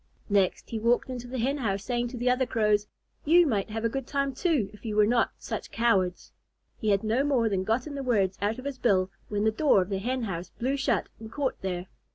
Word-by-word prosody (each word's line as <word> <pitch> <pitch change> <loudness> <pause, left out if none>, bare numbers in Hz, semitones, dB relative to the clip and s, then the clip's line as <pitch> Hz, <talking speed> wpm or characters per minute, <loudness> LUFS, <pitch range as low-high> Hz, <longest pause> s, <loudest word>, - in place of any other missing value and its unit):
Next 195 -3 +1
he 225 - -2
walked 240 +3 +2
into 245 -1 -6
the 255 +1 -5
Hen 270 +5 0
house, 200 -5 -1
saying 240 +2 -1
to 245 +1 -7
the 245 +1 -2
other 250 0 +2
Crows, 210 -3 +2 0.4
"You 345 +3 +6
might 215 -9 0
have 225 +1 -3
a - - +5
good 270 +2 -4
time, 275 -1 -1
too, 290 - 0
if 210 - -15
you 215 -3 -3
were 210 0 +5
not 235 +2 +2
such - - -5
cowards." 195 -6 +1 0.5
He 220 - -1
had 200 0 +2
no 225 +5 +1
more 265 -6 +2
than 190 -2 0
gotten 235 +8 -1
the 280 - -4
words 200 -7 +1
out 210 +2 0
of 255 - -9
his 280 -2 -4
bill, 190 -4 +2 0.2
when 205 0 -1
the 220 - +3
door 265 0 +4
of 185 +1 -1
the 195 -1 -1
Hen 250 +4 -2
house 180 -4 -4
blew 260 +4 -2
shut 270 -6 0
and 220 0 -9
caught 275 0 -2
there. 180 -2 -3
230 Hz, 240 wpm, -28 LUFS, 205-260 Hz, 0.5 s, You